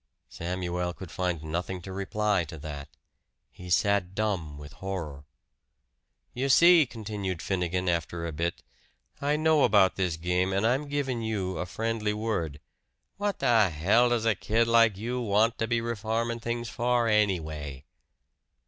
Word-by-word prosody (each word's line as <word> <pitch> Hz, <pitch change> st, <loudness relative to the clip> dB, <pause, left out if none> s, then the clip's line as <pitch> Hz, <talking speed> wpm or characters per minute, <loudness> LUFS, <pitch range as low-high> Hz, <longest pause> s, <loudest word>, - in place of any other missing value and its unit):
Samuel 90 Hz, 0 st, -3 dB
could 95 Hz, -4 st, -9 dB
find 90 Hz, -4 st, -2 dB
nothing 85 Hz, +4 st, -3 dB
to 95 Hz, -, -7 dB
reply 100 Hz, 0 st, 0 dB
to 80 Hz, +1 st, -9 dB
that. 75 Hz, -2 st, -7 dB, 0.6 s
He 90 Hz, 0 st, -11 dB
sat 100 Hz, -1 st, +2 dB
dumb 90 Hz, -9 st, -2 dB
with 75 Hz, -1 st, -11 dB
horror. 80 Hz, -6 st, -6 dB, 1.1 s
"You 135 Hz, +3 st, -1 dB
see," 170 Hz, +1 st, +7 dB
continued 105 Hz, -6 st, -5 dB
Finnegan 90 Hz, 0 st, -1 dB
after 85 Hz, 0 st, -1 dB
a 85 Hz, -, -3 dB
bit, 85 Hz, +3 st, -3 dB, 0.6 s
"I 145 Hz, +1 st, +1 dB
know 155 Hz, -1 st, +3 dB
about 100 Hz, -4 st, +4 dB
this 90 Hz, -4 st, 0 dB
game, 90 Hz, +3 st, 0 dB
and 100 Hz, +3 st, +1 dB
I'm 130 Hz, +5 st, +1 dB
givin' 135 Hz, -4 st, -2 dB
you 100 Hz, -5 st, -2 dB
a 90 Hz, -, -3 dB
friendly 110 Hz, +1 st, -2 dB
word. 105 Hz, -9 st, -2 dB, 0.6 s
What 205 Hz, -1 st, -1 dB
the 115 Hz, -7 st, +4 dB
hell 100 Hz, +10 st, +3 dB
does 120 Hz, -2 st, 0 dB
a 115 Hz, -, +4 dB
kid 115 Hz, +4 st, +1 dB
like 115 Hz, -3 st, +4 dB
you 120 Hz, +4 st, -3 dB
want 110 Hz, +1 st, +2 dB
to 115 Hz, -, 0 dB
be 115 Hz, 0 st, +1 dB
reformin' 115 Hz, +1 st, -2 dB
things 120 Hz, +1 st, -3 dB
for 120 Hz, +1 st, +1 dB
anyway?" 80 Hz, -10 st, 0 dB
100 Hz, 150 wpm, -28 LUFS, 90-115 Hz, 1.1 s, see